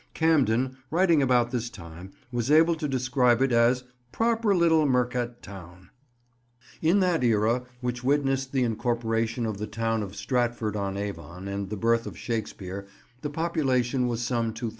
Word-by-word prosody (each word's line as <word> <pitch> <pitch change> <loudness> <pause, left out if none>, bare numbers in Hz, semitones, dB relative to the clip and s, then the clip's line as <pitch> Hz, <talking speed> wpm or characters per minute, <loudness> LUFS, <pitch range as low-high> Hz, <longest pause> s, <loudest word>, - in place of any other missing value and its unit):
Camden, 130 -5 +2
writing 170 -2 +3
about 125 -3 +2
this 120 -2 -2
time, 85 0 -11 0.2
was 120 0 -2
able 160 +3 +5
to 155 -2 -3
describe 125 -2 +2
it 135 0 +2
as 120 +2 +3 0.3
"proper 225 -3 +1
little 160 -3 +4
mercat 125 -2 -1
towne." 90 -2 -12 0.9
In 175 +5 +3
that 180 -6 +1
era 115 +2 +2 0.2
which 125 0 -3
witnessed 135 -1 +1
the 130 -2 +1
incorporation 115 0 -1
of 110 -3 -3
the 105 - -3
town 115 +1 -1
of 100 -1 -6
Stratford 115 0 -1
on 100 -1 -2
Avon 95 -2 -6
and 100 -1 -4
the 105 - -4
birth 115 +2 +1
of - - -8
Shakespeare 100 -4 -5 0.3
the 150 - -3
population 135 -6 0
was 120 0 -2
some 115 -2 -1
2000. 115 0 -3
120 Hz, 160 wpm, -26 LUFS, 110-135 Hz, 0.9 s, able